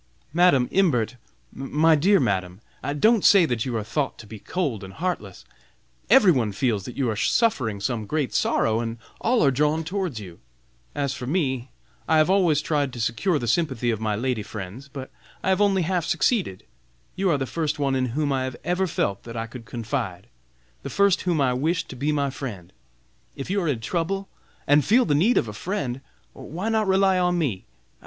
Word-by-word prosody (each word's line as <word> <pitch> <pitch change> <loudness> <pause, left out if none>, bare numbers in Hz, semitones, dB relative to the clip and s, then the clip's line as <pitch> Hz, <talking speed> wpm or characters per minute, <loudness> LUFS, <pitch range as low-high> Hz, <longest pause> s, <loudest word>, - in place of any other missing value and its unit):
"Madam 165 -8 +4
Imbert, 130 - +2 0.4
my 150 +4 +2
dear 185 +7 +4
Madam, 95 -2 -1 0.4
don't 220 +1 +4
say 195 -4 +7
that 120 -6 -1
you 120 -3 -2
are 110 - -2
thought 140 +6 -2
to - - -11
be 105 +1 -10
cold 135 - -3
and 95 0 -9
heartless! 180 - -4 0.6
Every 210 -9 +7
one 115 -9 0
feels 105 -3 0
that 125 - -8
you 135 -3 +1
are 110 - -1
suffering 115 - +1
some 110 0 -2
great 150 -1 -1
sorrow, 110 0 +1
and 115 0 -3 0.2
all 240 0 +2
are 135 - +4
drawn 150 +4 +1
towards 180 - -3
you. 90 -5 -11 0.6
As 140 -2 -1
for 125 -3 -6
me 135 -6 -1 0.4
I 160 - +4
have 155 +4 +4
always 175 -7 +3
tried 145 -5 0
to 120 - -7
secure 135 - 0
the 120 - -4
sympathy 125 -3 +1
of 110 -1 -3
my 110 -1 0
lady 120 0 -1
friends, 105 +5 -8
but 135 -2 -8 0.3
I - - 0
have 190 +2 +2
only 195 -3 +3
half 175 -1 0
succeeded. 185 - 0 0.5
You 190 0 +1
are 155 - +3
the 135 - -2
first 155 +2 -2
one 140 -2 0
in 130 -1 +1
whom 145 -2 +1
I 130 -1 0
have 130 -1 -5
ever 185 +2 0
felt 100 - -1
that 115 0 -7
I 115 - -2
could 115 0 -10
confide, 115 -4 -4 0.5
the - - -6
first 200 -2 +3
whom 165 -3 +1
I 130 -3 +2
wished 160 +7 -1
to - - -7
be 140 +4 -1
my 140 -2 0
friend. 105 - -7 0.6
If 135 +6 -5
you 200 0 +1
are 170 - -1
in 130 -7 -1
trouble 190 +8 -2 0.4
and 145 +1 +4
feel 245 +5 +4
the 150 - +1
need 190 +12 +3
of - - +2
a 105 - -6
friend, 135 - -3 0.3
why 180 +8 -5
not 220 -2 +1
rely 190 -1 +3
on 180 0 +1
me? 125 - -2
140 Hz, 200 wpm, -24 LUFS, 115-180 Hz, 0.6 s, say